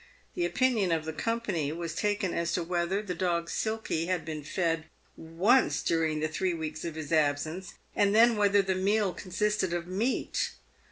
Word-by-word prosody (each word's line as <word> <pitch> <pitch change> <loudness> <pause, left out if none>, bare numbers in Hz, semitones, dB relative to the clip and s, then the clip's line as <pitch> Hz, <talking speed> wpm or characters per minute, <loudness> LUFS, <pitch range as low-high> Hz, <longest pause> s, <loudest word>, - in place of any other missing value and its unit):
The 350 -1 0
opinion 235 - +2
of 160 -2 0
the 160 - -4
company 200 -8 -1
was 165 0 -4
taken 205 0 0
as 170 0 -1
to 175 - 0
whether 175 +4 -1
the 190 -4 -3
dog 170 -1 -1
Silky 220 -7 -1
had 185 -1 -1
been 155 -2 -5
fed 165 0 -1 0.3
once 185 +11 +2
during 160 -2 +1
the 155 - +1
three 175 +3 -1
weeks 155 -1 -5
of 165 -2 -4
his 155 -1 -6
absence, 155 +4 0 0.2
and 205 0 +3
then 230 +1 +6
whether 205 -1 +4
the 190 0 0
meal 195 +1 +1
consisted 195 0 -1
of 175 -1 -2
meat. 200 +8 -1
180 Hz, 175 wpm, -29 LUFS, 160-205 Hz, 0.3 s, then